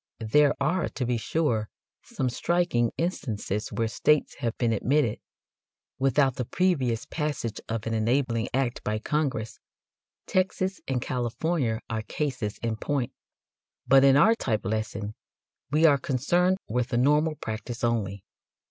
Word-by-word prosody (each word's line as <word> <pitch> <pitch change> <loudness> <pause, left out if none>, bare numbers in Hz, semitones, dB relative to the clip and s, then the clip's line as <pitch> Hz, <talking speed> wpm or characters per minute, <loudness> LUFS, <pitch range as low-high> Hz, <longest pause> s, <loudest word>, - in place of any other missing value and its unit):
There 150 +1 +5
are, 155 +6 +1
to 130 - -3
be 120 0 0
sure, 115 -4 0 0.3
some 130 - -3
striking 125 -3 +1
instances 110 - -2
where 115 - 0
states 150 +6 +2
have 115 -1 -2
been 115 -2 +1
admitted 125 +1 +1 0.8
without 135 0 +2
the 125 - -1
previous 130 -9 +1
passage 150 -8 -3
of 115 -1 -3
an 115 - -2
enabling 115 +1 +1
act 125 -2 -1
by 105 0 -1
Congress 120 -3 -2 0.7
Texas 185 0 0
and 130 -2 -1
California 125 0 -1
are 110 -1 -2
cases 125 -3 -3
in 115 -1 -1
point 135 +1 -2 0.7
but 135 0 +6
in 135 0 +6
our 220 +10 +6
type 115 - -2
lesson 110 0 -2 0.6
we 155 +3 +3
are 145 -3 +6
concerned 175 +9 +1
with 120 +2 0
the 125 -3 -1
normal 150 +5 +3
practice 110 0 -6
only. 100 -5 -1
125 Hz, 140 wpm, -27 LUFS, 115-150 Hz, 0.8 s, but